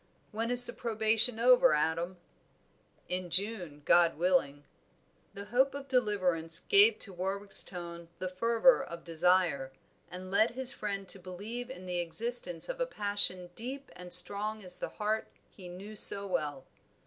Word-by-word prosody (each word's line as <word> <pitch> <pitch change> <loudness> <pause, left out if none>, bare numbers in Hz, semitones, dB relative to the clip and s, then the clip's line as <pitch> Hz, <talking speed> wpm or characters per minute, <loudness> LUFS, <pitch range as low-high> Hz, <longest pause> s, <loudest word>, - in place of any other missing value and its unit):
"When 225 +2 -3
is 245 0 +4
the - - -2
probation 225 +1 +2
over, 250 -1 +4
Adam?" 165 +4 -2 0.9
"In 180 0 -5
June, 180 -5 -4
God 170 -3 +3
willing." 165 -5 0 0.7
The 200 0 -8
hope 265 +2 +2
of 280 -1 -8
deliverance 185 -10 0
gave 410 - +5
to 195 - -6
Warwick's 195 +3 -1
tone 170 -2 -9
the 185 - -5
fervor 230 +7 +2
of 170 0 -10
desire, 165 -5 0 0.4
and 185 +1 -9
led 220 +4 +4
his 260 0 +6
friend 200 -2 -5
to 195 - -2
believe 205 +7 -6
in 185 -8 -10
the 180 -1 -3
existence 175 0 -2
of - - -6
a - - -1
passion 205 - -1
deep 260 +5 -8
and 180 0 -11
strong 205 +4 +6
as 180 -1 -9
the - - -5
heart 215 +1 -3 0.2
he 185 -3 -13
knew 195 +4 -10
so 200 0 0
well. 145 -7 -4
195 Hz, 155 wpm, -30 LUFS, 175-225 Hz, 0.9 s, his